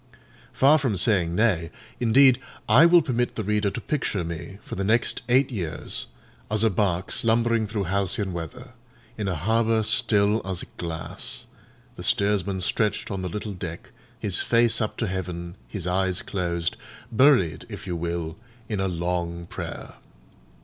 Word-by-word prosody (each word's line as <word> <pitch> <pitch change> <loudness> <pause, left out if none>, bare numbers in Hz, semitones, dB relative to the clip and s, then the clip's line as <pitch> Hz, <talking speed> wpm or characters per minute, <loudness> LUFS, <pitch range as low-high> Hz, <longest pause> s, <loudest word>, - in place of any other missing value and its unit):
Far 145 +4 +5
from 125 -8 0
saying 90 -5 +4
nay, 90 -6 +2 0.3
indeed, 125 +2 +6 0.3
I 130 +10 +7
will 170 -1 +6
permit 125 -4 -1
the 110 - -3
reader 105 0 +1
to - - -5
picture 110 - -2
me, 85 +3 -6
for - - -9
the 95 - -2
next 110 +4 +2
eight 130 +2 +3
years, 90 -9 -2 0.4
as 110 +1 +1
a 110 - +4
bark 95 -2 0
slumbering 115 -1 +2
through 105 -1 -2
halcyon 95 +1 0
weather, 125 +10 -7 0.4
in 105 -2 -3
a 90 - -1
harbour 110 +6 +1
still 105 0 +3
as 95 -1 -2
glass—the 80 -2 -7
steersman 100 -2 +1
stretched 105 +4 0
on 95 -1 -3
the 90 - -3
little 105 +3 -5
deck, 85 -2 -7 0.3
his 100 -4 0
face 115 0 +2
up 110 - -2
to 115 - -1
heaven, 90 -3 -4
his 100 -5 -5
eyes 90 0 0
closed: 85 -3 -2 0.3
buried, 120 - +4
if - - -8
you 90 -2 -3
will, 85 -1 -3 0.3
in 105 -3 -3
a 95 - 0
long 85 -1 -2
prayer. - - -7
100 Hz, 155 wpm, -25 LUFS, 90-115 Hz, 0.4 s, I